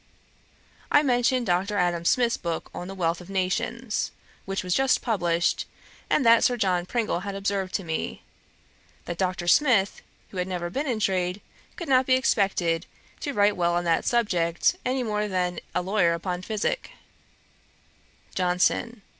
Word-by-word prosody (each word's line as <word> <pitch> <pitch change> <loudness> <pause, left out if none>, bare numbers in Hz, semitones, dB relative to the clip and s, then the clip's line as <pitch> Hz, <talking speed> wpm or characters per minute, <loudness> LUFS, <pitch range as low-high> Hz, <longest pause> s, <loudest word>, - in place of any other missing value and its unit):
I 290 - +6
mentioned 250 -1 +2
Dr. 190 +2 0
Adam 175 -2 0
Smith's 240 +4 +3
book 170 -2 -4
on 175 - -6
The 195 - -7
Wealth 170 -1 -1
of 180 - -13
Nations 215 +5 -1 0.4
which 195 0 -3
was 180 -1 -1
just 270 +4 +2
published, 175 -7 0 0.4
and 265 - +2
that 230 0 +6
Sir 245 - +3
John 180 -5 0
Pringle 225 -6 -1
had 200 +1 -5
observed 195 -1 -2
to 195 - -1
me, 160 -2 -4 0.8
that 175 -1 -5
Dr. 180 -2 -1
Smith, 225 -4 +3 0.3
who 190 - -8
had 180 0 -1
never 175 -2 -3
been 280 +8 -2
in 235 -4 -1
trade, 185 -2 0 0.4
could 340 - -6
not 260 -1 +4
be 255 - +5
expected 195 -9 +1 0.3
to 285 - -3
write 205 -2 +3
well 175 -1 +1
on 175 - 0
that 170 -1 +1
subject 180 -8 +1
any 255 0 0
more 210 -2 -1
than 180 -3 -1 0.2
a 180 - +1
lawyer 185 -3 +2
upon 180 +1 -4
physick. 215 +2 -2 1.4
JOHNSON. 185 +5 0
195 Hz, 160 wpm, -26 LUFS, 175-230 Hz, 1.4 s, I